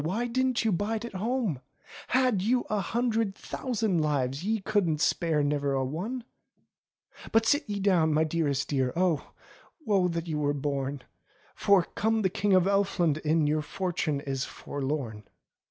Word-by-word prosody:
Why 200 +10 -1
didn't 255 0 0
you 220 - +3
bide 215 +5 -1
at 235 - -8
home? 210 - -1 0.5
Had 255 -6 +2
you 245 +5 +2
a 210 - +1
hundred 225 0 0
thousand 220 -11 -1
lives, 140 -1 0
Ye 220 +2 0
couldn't 190 -7 +1
spare 160 -1 +1
ne'er 145 -1 0
a 135 -1 0
one! 200 - -4 1.1
"But 225 0 +4
sit 285 +1 +2
you 205 -1 -2
down, 180 -5 +3
my 155 +1 +3
dearest 150 -4 0
dear. 130 -3 0
Oh! 175 -3 +1 0.6
woe 195 -5 +3
that 170 -1 -3
ye 160 - -3
were 145 -1 0
born, 140 -1 -3 0.5
For, 200 -3 +4
come 220 +3 0
the 190 - +2
King 200 +1 +1
of 185 - +5
Elfland 195 -6 +2
in 155 0 +2
Your 150 +1 +1
fortune 160 -3 -2
is 135 -2 -2
forlorn." 135 -9 -4
175 Hz, 160 wpm, -28 LUFS, 145-215 Hz, 1.1 s, of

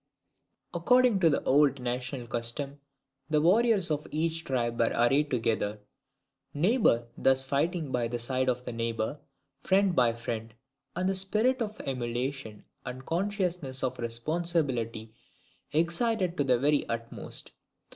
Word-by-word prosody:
According 250 -4 +4
to 165 -5 +3
old 140 -1 +3
national 125 0 -3
custom, 120 +5 -2 0.5
the 155 -1 +3
warriors 195 +2 +3
of 150 0 -2
each 165 +1 -1
tribe 120 -3 -1
were 115 - +3
arrayed 135 +5 +3
together; 115 -4 0 0.8
neighbour 160 - +3
thus 135 0 +3
fighting 150 +2 -1
by 120 -2 0
the 120 +1 -3
side 130 +2 0
of 125 0 -2
neighbour, 115 +3 -3 0.4
friend 190 +3 +2
by 120 -4 +4
friend, 115 -1 -5 0.4
and 180 +1 0
the 195 - +2
spirit 215 +7 +2
of 215 -1 -3
emulation 125 -2 -4 0.2
and 125 +1 -6
the - - -21
consciousness 180 -7 -1
of 130 -1 -2
responsibility 120 -3 -1 0.6
excited 175 +4 +1
to 145 - +1
the 125 -2 +3
very 145 +3 +1
utmost. 115 0 -5
135 Hz, 130 wpm, -29 LUFS, 120-170 Hz, 0.8 s, According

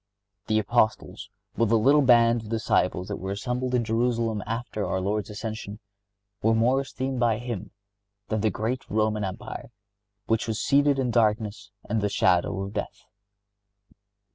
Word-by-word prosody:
The 110 - +2
Apostles 110 0 0 0.3
with 115 -2 +2
the 115 - +4
little 140 +7 +5
band 120 -2 +5
of 110 - -10
disciples 95 -5 0
that 100 - -4
were 95 - -6
assembled 125 +5 -2
in 120 - +2
Jerusalem 115 -1 0
after 115 -2 -3
our 95 - -1
Lord's 105 +3 -2
ascension, 105 -1 -6 0.6
were 110 +1 +3
more 125 +4 +3
esteemed 130 -1 -4
by 115 -3 +2
Him 115 -5 -5 0.6
than 110 -1 -1
the 110 - +2
great 115 +6 -2
Roman 110 0 +1
Empire, 95 -2 -6 0.6
which 115 +1 0
was 110 -2 -2
seated 140 0 +3
in 130 -2 0
darkness 105 -3 0 0.2
and 110 0 0
the 105 - +1
shadow 95 +1 +2
of 100 +1 -5
death. 105 - -5
110 Hz, 155 wpm, -26 LUFS, 105-120 Hz, 0.6 s, little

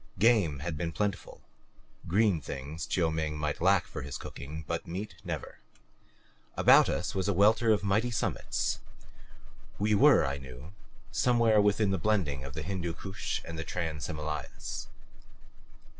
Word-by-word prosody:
Game 100 - +3
had 85 -3 -3
been 85 +2 -2
plentiful 100 +3 -3 0.7
green 95 -2 +3
things 70 +4 -6
Chiu 85 -3 +1
Ming 80 -1 -2
might 75 0 -2
lack 95 +1 +4
for - - -7
his 70 0 -5
cooking, 75 +3 -8
but 85 +1 -3
meat 95 +5 -5
never. - - -5 1.0
About - - +7
us - - -2
was 95 0 -1
a 100 - +2
welter 110 +4 +4
of 105 -1 +2
mighty 110 +4 +2
summits. 120 - -1 1.0
We 105 +2 +1
were, 100 - +6
I 70 +1 -2
knew, 65 +5 -11 0.4
somewhere 115 -4 +4
within 105 0 +2
the 95 - 0
blending 80 -10 0
of 70 +1 -8
the 80 - -4
Hindu 90 -3 -3
Kush 95 +4 -4
with 80 - -7
the 80 - -3
Trans 80 -3 -3
Himalayas. 75 -2 -5
85 Hz, 150 wpm, -30 LUFS, 75-105 Hz, 1.0 s, About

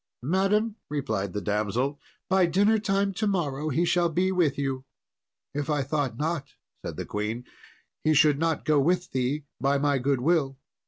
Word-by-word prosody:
"Madam," 200 - +1
replied 115 -10 -2
the 105 - -3
damsel, 110 +8 -1 0.3
"by 190 -1 +4
dinner 205 +6 +3
time 195 -1 0
to 215 +3 -1
morrow 155 -6 -1
he 165 +5 +1
shall 175 0 +2
be 180 +4 +1
with 170 -7 +2
you." 135 -2 -2 0.7
"If 145 0 -3
I 145 -2 +1
thought 135 -4 -1
not," 155 -1 -2 0.4
said - - -5
the - - -4
queen, 105 +3 -3 0.6
"he 155 0 +3
should 150 -1 +5
not 165 -1 0
go 155 -2 +4
with 175 +5 +1
thee 130 +3 -1 0.2
by 140 +1 +2
my 140 -1 +1
goodwill." 135 +2 +1
150 Hz, 165 wpm, -27 LUFS, 135-175 Hz, 0.7 s, should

